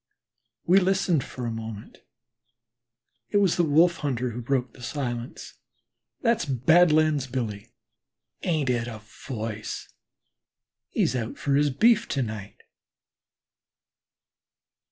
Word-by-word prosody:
We 185 +3 +6
listened 185 -5 +1
for 125 - -7
a 115 - -2
moment. 110 -1 -7 1.3
It 205 - +1
was 195 -4 +3
the 175 - +2
Wolf 165 +3 +4
hunter 125 -4 -2
who 120 +2 -5
broke 125 0 -1
silence: 120 -1 -5 0.6
"That's 230 -1 +2
Badlands 155 +1 +3
Billy; 115 -4 -4 0.7
ain't 155 -7 0
it 120 -1 -1
a 110 -3 -8 0.2
voice? 110 -4 -5 1.0
He's 125 - 0
out 115 -2 -3
for 140 - -1
his 145 +1 +3
beef 230 - +3
to 135 - -1
night." 105 -3 -7
130 Hz, 110 wpm, -26 LUFS, 115-160 Hz, 1.3 s, We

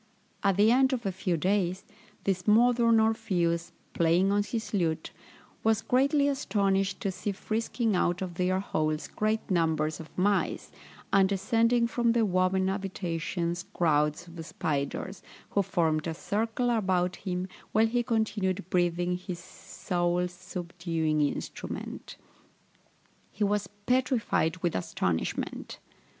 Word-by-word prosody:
At 195 -2 +2
the 210 +2 +5
end 265 +2 +4
of 235 -3 -3
a 195 - +1
few 185 -2 -1
days, 185 +1 0 0.4
this 185 -1 -1
modern 230 +1 +5
Orpheus, 185 -7 +1 0.2
playing 170 +4 +3
on 205 0 +3
his 220 +2 -4
lute, 165 -5 0 0.5
was 225 0 +2
greatly 280 +3 +3
astonished 200 -8 0
to 195 - 0
see 185 +3 -3
frisking 220 +2 -1
out 175 0 +1
of 180 -2 -5
their 185 +2 +1
holes 155 -5 -1
great 215 0 -1
numbers 160 -3 +1
of 160 - -9
mice, 200 +2 +1 0.4
and 195 -1 +5
descending 230 +4 +2
from 235 0 +1
their 235 -2 +3
woven 185 0 +2
habitations 180 -2 -2
crowds 150 0 +1
of 170 -1 -8
spiders, 160 +4 -3 0.3
who 200 - +3
formed 160 -4 0
a 165 - -3
circle 225 +6 -1
about 185 -5 +1
him, 180 -1 -3 0.2
while 220 +1 +4
he 240 +2 +1
continued 210 -6 -1
breathing 175 0 +1
his 180 -1 -6
soul 175 0 -2
subduing 175 -3 -2
instrument. 145 - -4 1.1
He 210 - -2
was 205 -1 +1 0.2
petrified 250 -9 +1
with 175 - +1
astonishment. 90 -2 -2
190 Hz, 130 wpm, -29 LUFS, 175-220 Hz, 1.1 s, the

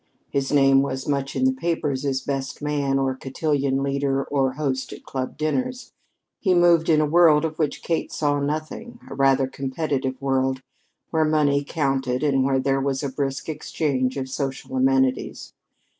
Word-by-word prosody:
His 135 -1 -1
name 135 -2 +5
was 130 -1 -3
much 140 -1 -1
in 260 - +1
the 260 - +3
papers 155 - -2
as 135 -1 0
"best 135 -1 -4
man" 145 -2 0
or 135 -1 +1
cotillion 135 0 -1
leader 140 0 0
or 135 -2 0
host 135 -2 -2
at - - -10
club 130 -1 -5
dinners. 250 +12 -2 0.5
He 185 -3 +2
moved 170 -2 +4
in 155 -2 +5
a - - +3
world 160 -1 +5
of 155 0 -5
which 150 -3 -1
Kate 165 -1 -1
saw 145 -1 0
nothing 155 +12 -4
a - - -8
rather 135 -1 +3
competitive 135 0 -3
world, 130 -1 0 0.5
where 160 -1 +2
money 150 -2 +2
counted 135 -3 -1
and 135 -3 +2
where 135 0 +2
there 135 +1 +1
was 135 0 -1
a 140 - -1
brisk 135 0 -3
exchange 140 -4 -1
of 130 -1 -3
social 135 0 -4
amenities. 130 0 +1
140 Hz, 170 wpm, -23 LUFS, 135-150 Hz, 0.5 s, name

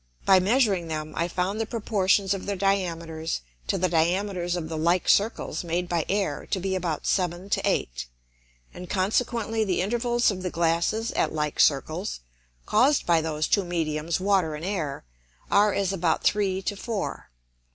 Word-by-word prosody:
By 190 -1 +6
measuring 200 -3 +2
them 155 -1 -4
I 170 - 0
found 185 +4 -2
the 225 - -2
Proportions 200 -4 +1
of 195 -1 -6
their 200 - -1
Diameters 170 -4 -1 0.3
to - - +1
the 185 - +1
Diameters 175 +2 0
of 170 -3 -3
the 160 - -5
like 170 +3 +1
Circles 205 -5 +1
made 175 +1 -2
by 170 -3 0
Air 195 -7 -1
to 190 - -1
be 190 +1 -2
about 175 -5 -2
seven 180 +1 -1
to - - +2
eight, - - -1 0.7
and 180 0 -9
consequently 220 +3 0
the 190 -4 0
Intervals 240 +4 +1
of 185 -2 -5
the 180 - -2
Glasses 170 +7 0
at - - 0
like 150 -1 -2
Circles, 155 - +1 0.4
caused 280 - +3
by 170 -2 +3
those 155 -1 -1
two 200 - +2
Mediums 165 -2 -2
Water 185 -5 +1
and 155 +3 -6
Air, 170 -8 -3 0.5
are 205 +1 +5
as 195 -1 0
about 175 -3 0
three 195 -2 +1
to 205 - -2
four. 215 0 -4
185 Hz, 170 wpm, -26 LUFS, 165-200 Hz, 0.7 s, By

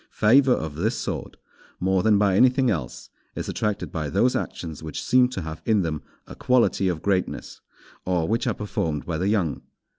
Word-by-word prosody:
Favour 130 +4 +5
of 80 -7 -3
this 110 +8 0
sort, - - -5 0.4
more 95 0 +2
than 110 0 +4
by 100 -2 +3
anything 130 +2 +4
else, - - -5 0.2
is - - -4
attracted 105 -1 -2
by 75 -3 -3
those 125 - +2
actions 80 -4 -4
which 80 -2 -6
seem 125 0 +4
to 95 -8 -5
have 80 0 -7
in 110 -4 +2
them 75 -3 -3 0.2
a - - -11
quality 125 -6 +2
of 85 -4 -2
greatness, 95 -2 -2 0.4
or 90 -3 0
which 115 +2 0
are - - 0
performed 80 -9 -3
by 80 -2 -3
the 95 - 0
young. 100 -8 0
95 Hz, 185 wpm, -24 LUFS, 80-110 Hz, 0.4 s, Favour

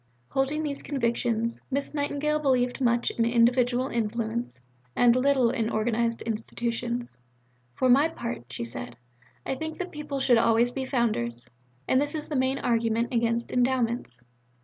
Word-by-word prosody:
Holding 280 +4 0
these 285 -2 -3
convictions, 235 -3 -1
Miss 280 +2 -2
Nightingale 295 +1 0
believed 255 -3 +1
much 240 -1 +2
in 230 - 0
individual 245 +2 +3
influence, 230 - -2 0.4
and 240 -1 +5
little 255 -2 +3
in 230 -3 -1
organized 230 +1 0
institutions. 235 - -3 0.6
"For 260 - +2
my 275 +5 +6
part," 120 - -5
she 120 - -4
said, 120 0 -7 0.5
"I - - -1
think 315 +4 -5
that 365 0 -4
people 295 -2 -5
should 245 -3 +4
always 230 +1 +3
be 265 +1 -3
Founders. 125 - -1 0.4
And 260 - +3
this 290 +2 -1
is 305 0 -4
the 300 - -2
main 260 +1 +1
argument 230 -1 0
against 235 0 0
Endowments. 245 - 0
240 Hz, 150 wpm, -27 LUFS, 230-270 Hz, 0.6 s, my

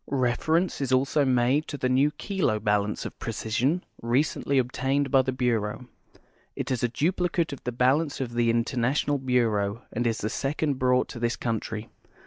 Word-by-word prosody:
Reference 140 +7 +1
is 135 -2 -1
also 135 +3 +3
made 130 +4 +2
to 145 - -5
the 130 - 0
new 130 +3 +3
Kilo 175 - -1
1)alance 105 0 0
of - - -7
precision 120 +9 -1 0.2
recently 135 +3 +1
obtaiiu'd 135 +2 0
by 135 -2 +6
the 130 - -2
Burcuui. 120 -2 -1 0.7
It - - -3
is 125 - 0
a 120 - +1
dui)li 175 +7 0
cate 165 -4 0
of 140 - -9
the 125 - -1
balance 135 +5 +1
of 125 -3 -3
the 120 -1 +2
International 125 +5 +1
Bureau 115 -4 0
and 120 +1 0
is 115 -1 -1
tlie 110 - -2
second 140 0 -1
brought 125 0 +3
to 120 - -7
this 120 0 0
country. 110 -1 -3
125 Hz, 175 wpm, -26 LUFS, 115-140 Hz, 0.7 s, by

